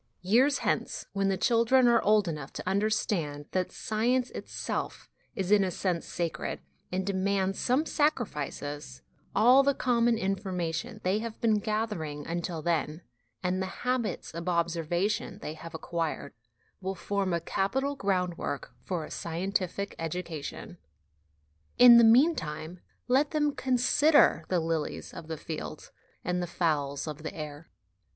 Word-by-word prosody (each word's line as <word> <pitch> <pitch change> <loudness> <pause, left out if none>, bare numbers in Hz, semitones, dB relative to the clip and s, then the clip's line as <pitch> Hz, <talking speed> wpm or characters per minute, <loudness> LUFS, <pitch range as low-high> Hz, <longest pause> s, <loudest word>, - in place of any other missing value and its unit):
Years 255 +9 +4
hence, - - -1
when 195 0 +1
the 190 - +1
children 240 +4 +4
are 235 -1 +5
old 210 -1 +3
enough 150 -4 -5
to - - -7
under 200 +3 +2
stand 160 -9 -1
that 185 -1 -1
science 245 +4 0
itself - - -4 0.3
is 190 0 -2
in 205 -1 +6
a 190 - 0
sense 180 -2 -2
sacred 170 -2 -3 0.3
and 185 +1 -1
demands 195 0 0
some 260 +6 +2
sacrifices, 145 - -2 0.3
all 250 +4 +7
the 280 0 +2
'common 235 -2 +2
informa 190 -4 -2
tion' 215 +6 -5
they 190 +3 +1
have 225 0 -6
been 220 -2 +3
gathering 205 -9 -3
until 170 -1 -3
then, 165 0 -1 0.4
and 185 +1 0
the 190 - -1 0.2
habits 250 -3 -1
of 170 +2 -4
observation 175 +4 0
they 155 - -6
have 165 +1 -9
acquired, 165 -3 -3 0.5
will 190 +1 -3
form 195 +1 -1
a 170 - +1
capital 265 - -1
groundwork 180 - -2
for 175 -4 -3
a - - -12
scientific 185 +3 -2
education. 165 -2 -5 1.0
In 245 -1 +10
the - - +7
meantime, 180 - +3 0.3
let 270 +4 +3
them 295 -2 +1
consider 260 - +4
the 180 - +2
lilies 160 -2 -3
of 165 -2 -9
the 160 -1 -4
field 155 0 -7 0.3
and 180 0 0
the 175 - -2
fowls 145 -5 -1
of 150 -1 -6
the 160 - -6
air. 150 0 -7
185 Hz, 145 wpm, -29 LUFS, 165-225 Hz, 1.0 s, In